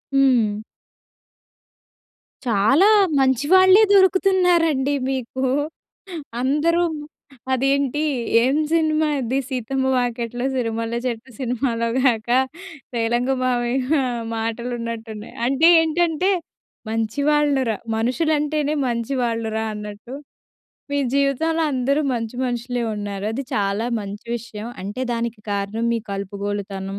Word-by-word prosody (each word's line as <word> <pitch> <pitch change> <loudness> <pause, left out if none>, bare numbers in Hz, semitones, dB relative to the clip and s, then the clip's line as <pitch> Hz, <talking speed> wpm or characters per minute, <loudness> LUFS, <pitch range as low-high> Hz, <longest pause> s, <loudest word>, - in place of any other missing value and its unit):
హ్మ్. 240 -6 +3 1.9
చాలా 235 - +4 0.3
మంచి 265 0 +2
వాళ్ళే 375 +2 +7
దొరుకుతున్నారండి 360 -7 +3 0.2
మీకు. 260 0 -3 1.0
అందరు 305 +6 +2 0.7
అదేంటి, 275 +2 +1 0.4
ఏం 265 +3 +2 0.2
సినిమా 315 -1 +2
అది 255 +1 -1
'సీతమ్మ 265 0 -1
వాకిట్లో 245 0 -2
సిరిమల్లె 230 -2 -2
చెట్టు' 245 +1 -4
సినిమాలో 240 -2 -1
గాక 235 -4 +1 0.7
రేలంగి 240 +3 +1
మావయ్య 255 +3 +1 0.4
మాటలున్నట్టున్నాయి. 230 -1 -5
అంటే 275 +5 +4
ఏంటంటే, 335 +3 +1 0.6
మంచి 225 +3 -2
వాళ్ళు 295 -2 +2
రా 220 - 0 0.2
మనుషులంటేనే 300 +4 0
మంచి 235 +2 -2
వాళ్ళు 230 -1 -1
రా 220 - -1
అన్నట్టు, 210 +4 -8 0.8
మీ 285 - +1 0.2
జీవితంలో 280 +4 +1
అందరూ 270 +3 +1
మంచి 230 0 -4
మనుషులే 245 0 -2
ఉన్నారు. 205 -1 -5
అది 260 +5 -3
చాలా 200 +2 0
మంచి 205 +2 -8
విషయం. 225 -2 -8 0.2
అంటే, 205 +6 -5
దానికి 235 -1 -3
కారణం 200 +3 -2
మీ 230 - -1
కలుపుగోలుతనం, 200 0 -4
245 Hz, 100 wpm, -21 LUFS, 225-280 Hz, 1.9 s, వాళ్ళే